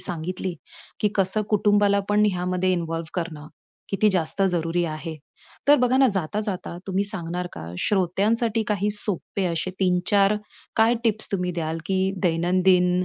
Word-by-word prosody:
सांगितली, 180 +1 -4 0.5
की 210 - +3
कसं 195 +2 +3
कुटुंबाला 205 -1 +3
पण 210 0 +3
ह्यामध्ये 180 +1 -1
इन्व्हॉल्व्ह 165 -2 -3
करणं 160 -4 -4 0.4
किती 205 +2 +2
जास्त 185 +2 +4
जरुरी 170 0 0
आहे. 160 0 -5 0.5
तर 290 - +8
बघा 250 +1 +2
ना 270 0 +5
जाता, 190 +3 -2
जाता 190 -5 -4
तुम्ही 195 +1 0
सांगणार 180 -3 -4
का 80 - -8
श्रोत्यांसाठी 210 +4 +1
काही 205 0 0
सोपे 205 -1 -3
असे 170 +2 -2
3-4 195 +3 +3 0.4
काय 225 +2 +4
टीप्स, 215 -1 +2
तुम्ही 180 -2 -1
द्याल 165 -1 -3
की 190 -1 0 0.2
दैनंदिन 180 +1 +2
185 Hz, 145 wpm, -24 LUFS, 175-205 Hz, 0.5 s, तर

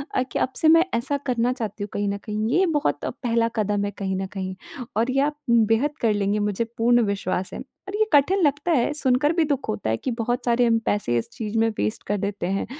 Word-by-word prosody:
अ, 255 - +3
कि 255 - -4
अब 260 - 0
से 315 - +2
मैं 330 +2 +6
ऐसा 235 +5 0
करना 245 -1 +1
चाहती 215 -4 -5
हूँ 205 - -5
कहीं 205 0 -1
न 200 - -2
कहीं, 215 +1 -3
ये 380 - +4
बहुत 305 -4 0
पहला 230 -2 0
कदम 205 -2 0
है 205 - -3
कहीं 190 -1 -2
न - - -2
कहीं, 190 -1 -4 0.4
और 230 +4 +1
ये 270 +1 +2
आप 295 +1 0
उम, 235 -2 +5
बेहद 260 +8 +1
कर 225 -2 +3
लेंगी, 205 0 0
मुझे 205 +1 0
पूर्ण 240 +1 +4
विश्वास 185 -1 -3
है। - - -5 0.3
और 390 - -4
ये 435 +1 +3
कठिन 295 +7 +4
लगता 290 +3 +1
है, 285 -2 +2
सुनकर 290 +1 +2
भी 335 -1 +2
दुख 285 -3 -2
होता 105 +1 -2
है 110 - +1
कि 255 - -3
बहुत 240 +2 -1
सारे 240 0 +3
हम 230 -1 +3
पैसे 190 -13 +1
इस 115 - -3
चीज़ 225 -2 -4
में 225 - +3
वेस्ट 105 +1 -2
कर 205 - 0
देते 200 -2 -3
हैं 195 +1 -1
230 Hz, 250 wpm, -24 LUFS, 205-275 Hz, 0.4 s, मैं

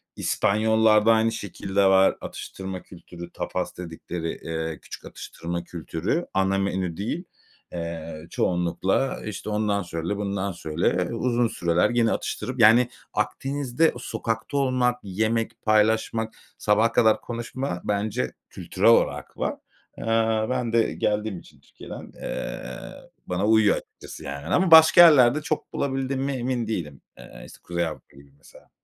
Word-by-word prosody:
İspanyollarda 110 +1 +3
aynı 115 0 +2
şekilde 100 -2 -1
var 95 0 +5
atıştırma 95 -1 -7
kültürü, 85 -1 -11
tapas - - -4
dedikleri, 85 -1 -5
eee, 80 -1 -5
küçük - - -10
atıştırma 85 +1 -6
kültürü. 85 - -3
Ana 95 0 +2
menü 95 -3 -2
değil. 120 - -3 0.5
Eee, 85 -1 -6
çoğunlukla, 90 +10 0
işte, 110 0 -5
ondan 105 -1 0
söyle, 85 +3 -4
bundan 100 -1 -2
söyle. 85 -2 -2 0.2
E, - - -5
uzun 120 0 +1
süreler 85 -4 +1
gene 120 -2 +2
atıştırıp, 130 -1 -3
yani, 115 +3 +6 0.2
Akdeniz'de 140 +2 0
sokakta 115 +5 -3
olmak, 125 -2 +1
yemek 110 +4 -1
paylaşmak, 110 +1 +2 0.2
sabaha 110 +2 +2
kadar 110 -2 +3
konuşma 120 -4 -4
bence 105 +4 -1 0.2
kültürel - - +1
olarak - - +2
var. - - -1 0.4
Eee, 115 -1 +1
ben 125 -2 -1
de 115 -1 +2
geldiğim 105 -2 -1
için - - -19
Türkiye'den, - - -11
eee, - - -4 0.7
bana 90 +3 -1
uyuyor 110 -2 +5
açıkçası, - - -11
yani. 70 0 -6
Ama 185 -2 +2
başka 160 +1 +9
yerlerde 150 -4 +7
çok 150 0 -3
bulabildiğime 135 0 -1
emin 125 -2 -2
değilim. 80 -10 -4 0.2
Eee, - - -12
es - - -13
Kuzey 85 -1 -2
Avrupa 80 - -10
gibi, 70 0 -17
mesela. - - -19
110 Hz, 135 wpm, -25 LUFS, 90-120 Hz, 0.7 s, başka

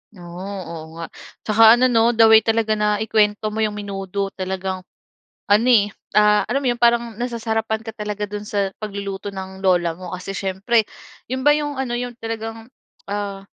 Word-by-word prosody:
Oh, 175 -1 -10
oo 185 -5 -6
nga. 165 0 -5 0.4
Tsaka, 220 +1 +7
ano 250 +1 +3
'no, 230 +1 +3
the 225 - +6
way 220 - +9
talaga 225 0 0
na 210 0 +2
ikuwento 215 0 +1
mo 215 - -4
yung 215 -1 0
menudo, 195 -1 -4
talagang 190 0 -4 0.7
ano, 215 +4 +4
eh, 205 -4 +5 0.3
ah, 210 0 +5
alam 275 +3 0
mo 260 - 0
yun 240 - -5
parang 235 -1 +3
nasasarapan 225 -2 -2
ka 225 - -6
talaga 210 -1 -4
dun 210 0 -5
sa 200 -2 -1
pagluluto 200 -1 -5
ng 190 0 -8
Lola 175 -3 +2
mo. 185 - -8
Kasi, 185 +2 -7
siyempre, 200 +5 +1 0.5
yun 260 0 -2
ba - - +8
yung 290 -1 -2
ano 245 -2 -2
yung 245 0 -4
talagang, 225 0 -6 0.4
ah, 200 -1 -4
210 Hz, 175 wpm, -21 LUFS, 195-225 Hz, 0.7 s, way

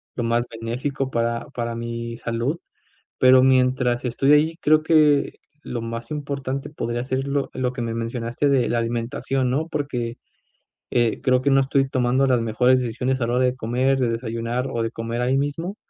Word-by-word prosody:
lo 120 - -2
más 120 +1 +1
benéfico 125 +4 -3
para 115 0 -1
para 115 -1 -3
mi 115 0 -5
salud. 120 +8 -2 0.6
Pero 130 0 +7
mientras 125 -2 +2
estoy 135 +4 +3
ahí, 160 +3 +3
creo 155 +1 +4
que 155 -3 +3 0.3
lo 120 -2 -4
más 115 +3 -5
importante 140 -2 -4
podría 120 -4 -3
ser 130 +1 -2
lo 140 0 -1
lo 125 -1 -1
que 125 - -5
me 115 -1 -3
mencionaste 115 +4 -1
de 135 -3 +3
la 120 - +1
alimentación, 120 +3 -1
¿no?, 155 +5 0
porque 125 -6 -3 0.7
eh, 120 -2 +1
creo 130 -1 +2
que 140 - +1
no 135 - +5
estoy 135 0 +1
tomando 130 +1 +2
las 125 -2 +3
mejores 125 +3 +3
decisiones 125 +2 -1
a 115 - +1
la 120 - -1
hora 130 - +2
de 125 0 +1
comer, 130 +4 +1
de 120 -2 +1
desayunar 115 +2 -2
o 115 -1 -1
de 115 - -1
comer 115 +1 -4
ahí 130 +2 +2
mismo 165 +7 -2
125 Hz, 185 wpm, -23 LUFS, 115-135 Hz, 0.7 s, Pero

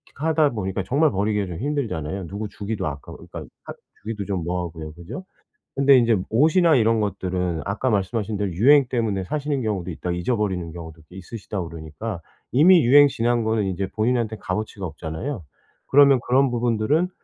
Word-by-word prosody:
하다 155 -1 +2
보니까 95 -3 -3
정말 145 - +2
버리기가 105 0 0
좀 85 - -6
힘들잖아요. 100 - -3
누구 105 +4 -5
주기도 100 +1 -4
아까워 70 -2 -7
그러니까 - - -10 0.2
하 - - -8 0.3
주기도 105 -2 -4
좀 95 -4 -2
뭐하고요, 85 -3 -4
그죠? 85 - -9 0.5
근데 140 0 +5
인제 115 -3 +4
옷이나 160 +7 +4
이런 115 -1 +3
것들은 90 -4 -2
아까 100 +6 -1
말씀하신 105 +1 -1
대로 100 -2 -2
유행 135 - +5
때문에 110 -6 -1
사시는 145 +3 -2
경우도 100 -5 -2
있다, 90 +2 -5
잊어버리는 95 -3 -1
경우도 80 -2 -10
꽤 90 - -14
있으시다 100 0 -6
그러니까 85 +5 -7 0.3
이미 165 +4 +6
유행 145 +4 +7
지난 120 -2 0
거는 110 -1 +1
이제 95 +1 -2
본인한테 115 -1 0
값어치가 100 0 -4
없잖아요. 80 - -5 0.4
그러면 140 -2 +6
그런 135 +2 +3
부분들은 120 +7 +1
105 Hz, 420 characters per minute, -23 LUFS, 90-125 Hz, 0.5 s, 유행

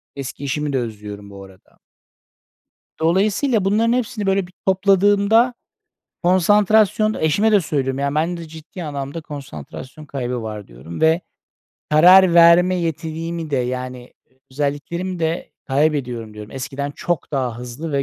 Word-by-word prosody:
Eski 140 +1 -7
işimi 145 +1 -2
de - - +1
özlüyorum 105 -3 -7
bu 100 0 -10
arada. 95 -1 -19 1.2
Dolayısıyla 200 - +1
bunların 225 +4 +2
hepsini 235 -4 -2
böyle 195 -1 +1
bir 180 - -20
topladığımda, 200 +5 +3 0.7
konsantrasyon, 210 +4 +3
eşime 200 +8 +2
de 205 - +5
söylüyorum, 135 -4 -2
yani, 140 +1 -1
"Bende 165 +1 -2
ciddi 160 +2 -9
anlamda 140 +2 -5
konsantrasyon 140 - -9
kaybı 125 -3 -4
var." 105 -2 -6
diyorum 65 +8 -10
ve 160 +2 +4 0.7
karar 180 +3 +7
verme 170 +2 +6
yetimi 165 -1 -4
de 140 - 0
yani, 125 0 -4 0.4
özelliklerimi 150 +6 -3
de 165 +1 -2 0.2
kaybediyorum 130 -6 -1
diyorum. 105 0 -9
Eskiden 140 +2 -5
çok 165 0 -3
daha 125 -4 -2
hızlı 125 +6 -6
ve 140 0 +1
155 Hz, 130 wpm, -20 LUFS, 130-185 Hz, 1.2 s, karar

